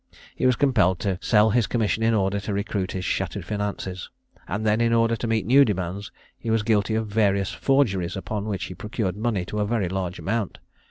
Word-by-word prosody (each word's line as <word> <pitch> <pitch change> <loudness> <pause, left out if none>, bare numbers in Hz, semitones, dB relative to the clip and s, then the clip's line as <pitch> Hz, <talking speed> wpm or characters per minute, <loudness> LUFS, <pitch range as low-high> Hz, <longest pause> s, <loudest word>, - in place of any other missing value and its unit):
He 130 - +1
was 125 - +4
compelled 120 -11 +3
to 95 -3 -1
sell 110 -1 +4
his 120 0 +2
commission 110 -2 0
in 115 0 +3
order 100 0 +1
to 100 +1 -4
recruit 100 -2 -2
his 95 -1 -4
shattered - - -2
finances; 100 -3 -4 0.4
and 100 +4 -3
then, 110 +1 +2
in 115 0 +2
order 115 0 +3
to 115 - -4
meet 110 -4 0
new 135 +6 +6
demands, 100 -2 -3 0.3
he 115 - -5
was 110 -1 +2
guilty 110 0 +1
of 110 0 0
various 100 -2 +1
forgeries, 100 -11 +1
upon 105 +1 -4
which 100 -4 -3
he 90 - -5
procured 105 -1 -3
money 105 -4 -1
to 105 - -4
a 105 - +1
very 105 -5 0
large 95 -1 -3
amount. 110 -1 -2
105 Hz, 210 wpm, -24 LUFS, 95-115 Hz, 0.4 s, new